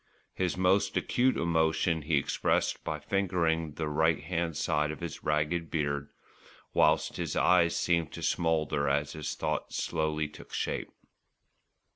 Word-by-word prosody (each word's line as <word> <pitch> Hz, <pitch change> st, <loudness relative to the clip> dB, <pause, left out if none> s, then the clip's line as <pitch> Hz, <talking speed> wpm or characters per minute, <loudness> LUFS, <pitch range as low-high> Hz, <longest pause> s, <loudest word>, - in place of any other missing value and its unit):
His 90 Hz, -1 st, -1 dB
most 95 Hz, +2 st, +2 dB
acute 130 Hz, +2 st, +2 dB
emotion 80 Hz, 0 st, +1 dB
he 75 Hz, 0 st, +1 dB
expressed 70 Hz, -, 0 dB
by -, -, -2 dB
fingering 85 Hz, -5 st, 0 dB
the 80 Hz, +1 st, -3 dB
right 80 Hz, +2 st, +2 dB
hand 85 Hz, -2 st, -2 dB
side 75 Hz, 0 st, +1 dB
of 75 Hz, -, -5 dB
his -, -, -6 dB
ragged 75 Hz, +2 st, 0 dB
beard, 70 Hz, -2 st, -1 dB, 0.6 s
whilst -, -, +3 dB
his -, -, -3 dB
eyes 85 Hz, -2 st, +4 dB
seemed 85 Hz, -3 st, +1 dB
to -, -, -7 dB
smoulder 80 Hz, -4 st, +1 dB
as 75 Hz, +1 st, 0 dB
his 75 Hz, -1 st, -4 dB
thoughts 75 Hz, -1 st, -3 dB
slowly 75 Hz, -1 st, -1 dB
took 75 Hz, -, -14 dB
shape. -, -, -2 dB
80 Hz, 140 wpm, -30 LUFS, 75-85 Hz, 0.6 s, eyes